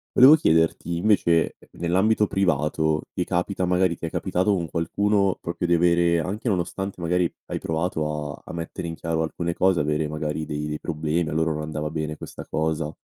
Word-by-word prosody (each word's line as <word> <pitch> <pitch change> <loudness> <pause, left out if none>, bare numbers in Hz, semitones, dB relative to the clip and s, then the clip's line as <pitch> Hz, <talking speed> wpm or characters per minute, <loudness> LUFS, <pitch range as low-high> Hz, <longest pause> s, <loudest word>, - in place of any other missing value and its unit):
Volevo 130 +5 +9
chiederti 80 - +1
invece 85 -4 +2 0.2
nell'ambito 100 +5 +2
privato 80 -4 +1
ti 90 - -1
capita 90 +1 -1
magari 90 -1 +2
ti - - -5
è - - -2
capitato 95 +3 +1
con 85 -4 -2
qualcuno 100 +3 +1
proprio 85 +1 -3
di 85 - +3
avere, 85 0 +3
anche 100 +9 -3
nonostante 95 0 -2
magari 90 0 +1 0.2
hai - - -3
provato 75 -3 -2
a - - -13
a - - -8
mettere 85 0 -5
in 80 - -4
chiaro 80 0 -1
alcune 85 +2 -3
cose, 95 0 +2
avere 75 +1 0
magari 75 0 -3
dei 75 0 -4
dei 75 0 -4
problemi 80 0 -1
a - - -4
loro 80 0 +1
non 75 - -4
andava 75 0 -3
bene 75 0 -3
questa - - -9
cosa, 80 -1 -2
85 Hz, 185 wpm, -24 LUFS, 80-90 Hz, 0.2 s, Volevo